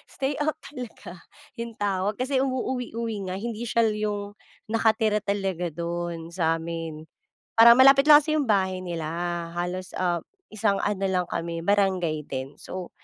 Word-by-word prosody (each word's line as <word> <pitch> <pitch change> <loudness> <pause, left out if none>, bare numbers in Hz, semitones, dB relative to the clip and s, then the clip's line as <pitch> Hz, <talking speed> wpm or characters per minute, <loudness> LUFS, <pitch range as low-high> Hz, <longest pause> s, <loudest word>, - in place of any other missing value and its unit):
stay-out 290 +3 -1
talaga 245 - -9 0.4
yung 235 -1 -5
tawag 200 0 -1
kasi 260 +1 0
umuuwi-uwi 240 -6 -2
nga 185 - -3
hindi 230 +3 -4
siya 225 -1 +2
yung 205 -1 -3 0.4
nakatira 220 -1 +2
talaga 190 -4 -2
dun 170 0 -4
samin 165 -2 -2 0.6
parang 235 +1 +10
malapit 275 +2 +7
lang 300 0 +9
kasi 310 +1 -1
yung 280 - 0
bahay 190 -3 +1
nila 170 -3 -4 0.5
halos, 180 +2 -3
ah, 175 -2 0 0.3
isang 205 -2 +1
ano 200 -1 -1
lang 180 -2 0
kami 165 0 -3
barangay 185 -6 +1
din. 135 +2 -5
So 185 -1 -7
200 Hz, 140 wpm, -26 LUFS, 175-230 Hz, 0.6 s, parang